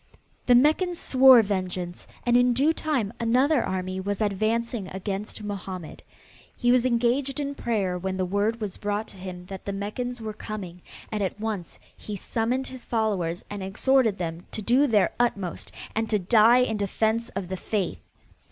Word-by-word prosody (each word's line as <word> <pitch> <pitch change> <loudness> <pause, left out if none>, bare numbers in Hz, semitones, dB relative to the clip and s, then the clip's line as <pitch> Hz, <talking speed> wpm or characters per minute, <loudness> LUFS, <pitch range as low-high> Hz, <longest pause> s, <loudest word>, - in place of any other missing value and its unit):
The 245 - +7
Meccans 315 +7 +3
swore 260 -5 +7
vengeance 185 -3 -3 0.2
and 240 -1 +3
in 245 0 +5
due 285 +6 +3
time 265 -11 -1
another 250 +4 +3
army 185 0 -3
was 200 +1 -2
advancing 215 +1 0
against 195 +3 -5
Mohammed. 190 -5 -6 0.5
He 245 0 +2
was 250 0 +4
engaged 255 +3 +1
in 285 -1 -2
prayer 200 -9 -1
when 190 +1 -3
the 185 - 0
word 205 +5 0
was 210 -4 -4
brought 205 +1 -2
to - - -12
him 180 -1 -8
that 190 0 -8
the 200 - -2
Meccans 240 +5 -4
were 220 -1 -5
coming 190 -5 -7 0.3
and 215 -1 -2
at 195 +1 -2
once 210 -5 -4 0.2
he 210 - -7
summoned 235 +6 -1
his 260 -2 -8
followers 195 -7 -1
and 205 -1 -6
exhorted 220 +3 +2
them 170 -1 -5
to 215 - -4
do 255 +7 +4
their 210 -6 +3
utmost 200 -7 -1 0.2
and 220 0 -1
to 215 - +3
die 225 +5 +5
in 220 -3 -1
defense 220 +3 0
of 195 -2 -3
the 190 - -3
faith. 185 - -2
215 Hz, 170 wpm, -26 LUFS, 190-245 Hz, 0.5 s, The